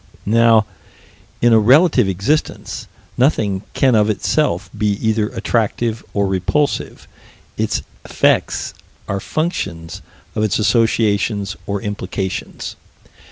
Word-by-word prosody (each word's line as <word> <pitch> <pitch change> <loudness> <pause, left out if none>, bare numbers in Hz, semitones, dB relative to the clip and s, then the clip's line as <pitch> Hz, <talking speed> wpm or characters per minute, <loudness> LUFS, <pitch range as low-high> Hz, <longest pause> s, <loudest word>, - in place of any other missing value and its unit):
Now, 115 0 +4 0.8
in 120 -1 +6
a 110 - +7
relative 135 - +5
existence, 100 - -2 0.3
nothing 110 -8 +2
can 130 -2 +3
of 105 -1 +3
itself 105 - 0
be 105 -1 +1
either 110 +1 0
attractive 115 0 -1
or 100 -1 +1
repulsive: 95 +10 -1 0.5
its - - -1 0.2
effects - - +1 0.3
are 100 - -2
functions 95 - -3 0.3
of - - -2
its 110 -3 +1
associations 105 -2 +1
or 100 0 -2
implications. 95 -2 -4
110 Hz, 105 wpm, -18 LUFS, 100-115 Hz, 0.8 s, a